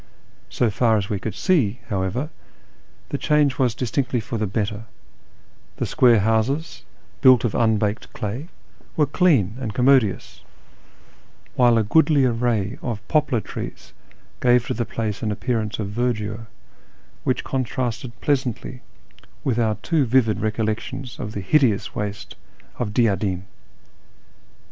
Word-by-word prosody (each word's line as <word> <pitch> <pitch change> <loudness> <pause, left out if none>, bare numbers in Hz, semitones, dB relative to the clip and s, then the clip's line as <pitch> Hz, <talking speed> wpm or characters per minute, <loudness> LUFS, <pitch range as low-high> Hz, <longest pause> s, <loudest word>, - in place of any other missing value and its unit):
So 120 -3 +1
far 110 +1 +3
as 100 +1 -3
we 100 - -1
could 105 0 -5
see, 130 - +1
however, 105 - -2 0.8
the - - -3
change 150 -3 +2
was 125 -4 +2
distinctly 125 +1 -1
for 115 +1 -4
the 105 - 0
better; 105 +2 -3 0.9
the - - -1
square 120 -4 +4
houses, 115 +9 0 0.4
built 130 -4 +7
of 120 - 0
unbaked 110 -2 0
clay, 120 +7 -5 0.5
were 150 - +4
clean 140 - +2
and 110 -6 -4
commodious, 125 -5 +2 1.1
while 120 -2 +4
a 110 - +3
goodly 145 +4 +4
array 115 -4 0
of 115 -4 -5
poplar 150 -7 +1
trees - - -8 0.5
gave 125 -1 +4
to - - -2
the 120 +1 -2
place 110 -3 -3
an 110 -3 -1
appearance 110 0 -2
of 105 -3 -3
verdure 115 -1 -2 0.8
which - - 0
contrasted 125 -2 -3
pleasantly 130 -2 -1 0.6
with 120 -3 0
our 110 -2 +2
too 160 -4 +2
vivid 115 -3 +3
recollections 110 +4 -3
of 105 - -5
the 100 - -4
hideous 115 +1 +2
waste 105 0 -5 0.4
of 115 -4 -2
Diyadin. 100 -5 +1
115 Hz, 130 wpm, -22 LUFS, 105-130 Hz, 1.1 s, built